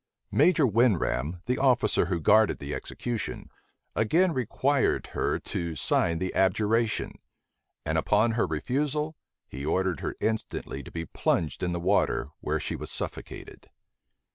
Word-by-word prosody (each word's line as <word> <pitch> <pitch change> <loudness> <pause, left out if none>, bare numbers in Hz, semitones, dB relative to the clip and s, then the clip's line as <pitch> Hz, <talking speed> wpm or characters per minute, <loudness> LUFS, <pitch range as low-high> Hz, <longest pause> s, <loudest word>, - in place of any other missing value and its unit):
Major 165 -5 +4
Winram, 95 - +1
the 125 +1 0
officer 125 -9 +3
who 90 -2 -1
guarded 110 +7 +4
the 70 +1 -6
execution, 120 -3 -5 0.4
again 165 +11 +3
required 130 +2 +1
her - - 0
to 85 -2 -4
sign 85 +3 +1
the 95 +2 -3
abjuration; 110 +4 +1 0.7
and - - +1
upon 105 +3 +3
her 115 -4 +1
refusal, 150 - -1 0.3
he 70 - -7
ordered 90 +1 0
her - - -4
instantly 110 0 -2
to - - -11
be 80 -1 -5
plunged 80 0 -1
in 90 - 0
the 85 - -2
water, 70 -4 +1
where - - -1
she - - -3
was - - -6
suffocated. - - -7
105 Hz, 140 wpm, -27 LUFS, 85-125 Hz, 0.7 s, Major